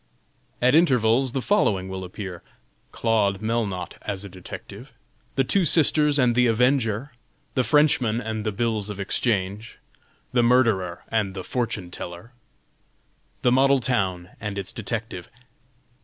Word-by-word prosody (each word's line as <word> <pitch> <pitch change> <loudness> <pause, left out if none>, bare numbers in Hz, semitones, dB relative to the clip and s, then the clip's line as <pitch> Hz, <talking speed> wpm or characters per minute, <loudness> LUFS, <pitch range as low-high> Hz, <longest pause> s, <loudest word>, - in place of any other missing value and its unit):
At 125 +1 +5
intervals 130 -5 +3
the 135 - -2
following 100 - +2
will 95 0 -5
appear: 90 -1 -7 0.5
"CLAUDE 105 -4 +1
MELNOTTE 110 -5 -3
AS 100 0 -4
A - - -8
DETECTIVE." 90 -1 -10 0.4
"THE 135 - +3
TWO 190 +9 +2
SISTERS 150 -2 +4
AND 125 -3 +3
THE 125 +1 +3
AVENGER." 125 +1 +1 0.4
"THE 130 - +1
FRENCHMAN 125 -3 +3
AND 110 -2 -4
THE 110 - -1
BILLS 110 -1 -1
OF 105 -1 -6
EXCHANGE." 100 +1 -2 0.6
"THE 125 - +4
MURDERER 115 -8 +2
AND 105 -4 -1
THE 95 - -5
FORTUNE 105 -7 -3
TELLER." 90 +7 -8 1.1
"THE 125 - +4
MODEL 135 +2 +4
TOWN 95 -8 -1
AND 105 -1 -5
ITS 95 +1 -4
DETECTIVE." 110 -5 -5
115 Hz, 135 wpm, -24 LUFS, 100-125 Hz, 1.1 s, At